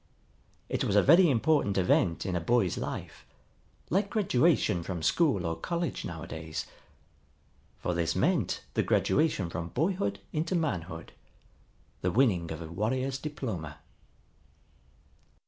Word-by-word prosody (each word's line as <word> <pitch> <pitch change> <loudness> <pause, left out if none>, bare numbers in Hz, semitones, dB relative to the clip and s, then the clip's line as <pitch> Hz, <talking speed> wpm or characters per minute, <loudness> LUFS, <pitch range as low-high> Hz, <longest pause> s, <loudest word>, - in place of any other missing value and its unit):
It - - -1
was 100 - 0
a 105 - +6
very 170 +4 +7
important 135 -5 +2
event 90 -2 +2
in 95 - -1
a - - +1
boy's 95 +1 +2
life, - - -6 0.7
like 195 +4 +2
graduation 165 - +2
from 85 -1 -5
school 140 - +2
or 80 0 -1
college 170 - -3
nowadays. 80 -1 -5 1.1
For 90 - -2
this 85 -1 0
meant - - +1
the - - +2
graduation 145 - +1
from 85 -1 -4
boyhood 120 - -1
into 165 +4 -1
manhood, 140 - -3 0.9
the 90 - +1
winning 90 -7 +2
of 80 +1 -5
a - - -7
warrior's 130 +10 -1
diploma. 105 - -5
105 Hz, 125 wpm, -29 LUFS, -, 1.1 s, very